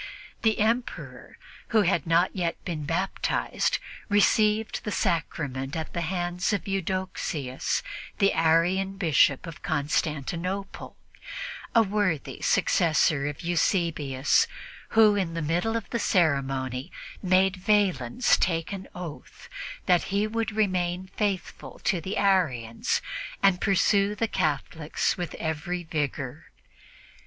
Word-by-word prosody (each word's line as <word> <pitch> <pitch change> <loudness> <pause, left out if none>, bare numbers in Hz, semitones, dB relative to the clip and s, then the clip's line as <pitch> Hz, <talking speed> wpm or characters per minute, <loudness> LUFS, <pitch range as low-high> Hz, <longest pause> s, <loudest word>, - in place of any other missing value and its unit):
The 220 -1 +2
Emperor, 230 +4 -2 0.3
who 220 -2 +3
had 175 -4 +1
not 170 +4 +3
yet 175 -3 -2
been 155 -5 -3
baptized, 175 +5 0 0.3
received 210 +1 +3
the 210 - -3
Sacrament 145 -6 -1
at 160 -1 -4
the 170 - -2
hands 175 +2 -1
of 200 - -2
Eudoxius, 185 -8 -2 0.3
the 195 - +3
Arian 175 +4 +2
Bishop 155 -6 +3
of 165 -2 -9
Constantinople, 160 +5 -2 0.8
a 230 - +7
worthy 195 -7 -1
successor 150 -3 +2
of 145 -1 -5
Eusebius, 165 -5 +1 0.5
who, 215 -2 +7
in 180 -5 -1
the 165 - -2
middle 175 +9 0
of 230 - -6
the 235 - 0
ceremony, 135 - 0 0.3
made 185 +1 +3
Valens 195 - +2
take 165 +1 0
an 195 -1 -6
oath 175 -4 -9 0.4
that 180 -1 +3
he 200 +2 0
would 225 +1 -2
remain 185 -3 0
faithful 200 -4 -3
to 180 - +1
the 190 +6 -4
Arians 140 - +1 0.4
and 195 -2 +4
pursue 200 +1 +3
the 225 +2 0
Catholics 155 -2 -1
with 175 -3 -5
every 160 +2 -3
rigor. 140 -2 -3
175 Hz, 115 wpm, -27 LUFS, 155-195 Hz, 0.8 s, a